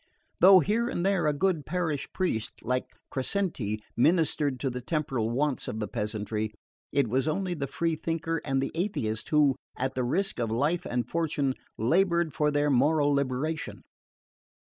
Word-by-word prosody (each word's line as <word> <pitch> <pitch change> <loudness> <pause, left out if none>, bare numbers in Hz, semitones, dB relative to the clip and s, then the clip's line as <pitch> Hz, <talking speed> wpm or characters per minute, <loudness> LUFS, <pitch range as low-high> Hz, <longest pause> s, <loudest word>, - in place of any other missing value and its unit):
Though 185 +1 +8
here 225 +8 +1
and 175 - -2
there 195 -5 +2
a - - +4
good 165 0 +1
parish 160 -3 -2
priest 170 - -2
like 125 +2 -1 0.2
Crescenti 130 - -1
ministered 150 -2 +2
to 135 - 0
the 125 +1 -5
temporal 135 -6 -1
wants 135 +3 -1
of 110 - -4
the 105 - -2
peasantry, 110 0 -3 0.4
it 140 -3 +2
was 130 +5 0
only 180 +3 -1
the 140 -5 -3
free 165 +4 -1
thinker 165 +1 -2
and 135 -2 0
the - - -3
atheist 160 - -2
who, 150 -3 +4 0.2
at 130 +1 -1
the 130 - -1
risk 170 +7 0
of 115 -2 0
life 145 +10 0
and 125 0 -1
fortune, 150 -5 0 0.2
laboured 170 - +2
for 150 +2 +2
their 145 0 +1
moral 145 +3 +3
liberation. 140 +3 -2
145 Hz, 165 wpm, -28 LUFS, 125-165 Hz, 0.4 s, Though